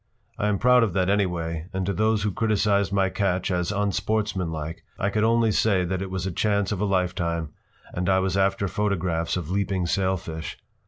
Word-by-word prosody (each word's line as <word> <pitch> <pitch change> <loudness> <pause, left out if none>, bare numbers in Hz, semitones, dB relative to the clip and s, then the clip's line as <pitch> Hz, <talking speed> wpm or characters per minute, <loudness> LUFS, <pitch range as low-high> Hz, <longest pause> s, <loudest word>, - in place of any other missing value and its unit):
I 105 - +1
am 105 -1 +1
proud 125 +3 +5
of 110 -6 +1
that, 95 0 +1
anyway, 85 -5 -1
and 95 -1 -1
to 100 - -1
those 110 +2 +1
who 105 - 0
criticized 100 -2 +1
my 95 -1 +2
catch 95 -2 -1
as 90 +1 0
unsportsman 100 -2 -1
like 80 +1 -5
I 100 - 0
could 105 +1 +1
only 115 0 +3
say 100 -3 +2
that 95 +1 -2
it 95 - -4
was 95 -1 -3
a 95 - -2
chance 100 +2 0
of 100 -2 -2
a - - +2
lifetime 90 -4 -1 0.4
and 90 +1 -1
I 95 - +4
was 95 -1 0
after 100 0 +1
photographs 90 -4 -1
of 85 -2 -5
leaping 95 -2 0
sailfish. 85 -3 -2
95 Hz, 200 wpm, -25 LUFS, 90-105 Hz, 0.4 s, proud